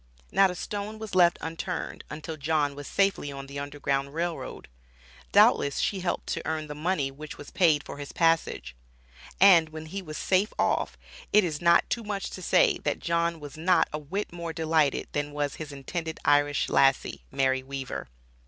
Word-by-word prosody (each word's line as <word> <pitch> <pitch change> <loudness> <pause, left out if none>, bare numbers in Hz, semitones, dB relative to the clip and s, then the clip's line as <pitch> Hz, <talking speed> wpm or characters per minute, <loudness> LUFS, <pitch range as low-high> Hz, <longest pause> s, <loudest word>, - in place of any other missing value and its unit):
Not 195 -1 +5
a 180 - -4
stone 205 +3 -5
was 220 -1 -8
left 175 -2 +5
unturned 165 +2 -4
until 155 +1 -6
John 150 -1 0
was 145 0 -8
safely 195 -7 +1
on 135 0 -7
the 140 +1 -7
Underground 140 0 -2
Rail 170 0 -1
Road. - - -8 0.6
Doubtless 140 -1 +5
she 195 - 0
helped 180 -1 -2
to - - -2
earn 160 -1 -2
the 150 - -7
money 150 -2 -1
which 150 +2 -9
was 145 - -11
paid 155 -5 +3
for - - -8
his 145 - -7
passage. 165 - +1 0.6
And 175 -5 +7
when 155 0 -8
he 195 +5 -5
was 155 -4 -7
safe 195 +3 +1
off, - - 0 0.3
it 210 - +6
is 160 -3 -3
not 170 0 +5
too 235 - -1
much 205 -2 -4
to 185 - -7
say, - - +3
that - - -1
John 170 0 0
was 145 0 -9
not 175 +2 +3
a 150 - -2
whit 180 +7 -4
more 170 -1 -5
delighted 160 -3 +1
than 145 0 -2
was 145 -1 -2
his 155 -2 -7
intended 160 +4 -5
Irish 145 0 +3
lassie, 135 -1 +2
Mary 130 -1 +1
Weaver. 135 0 -6
155 Hz, 185 wpm, -27 LUFS, 145-175 Hz, 0.6 s, And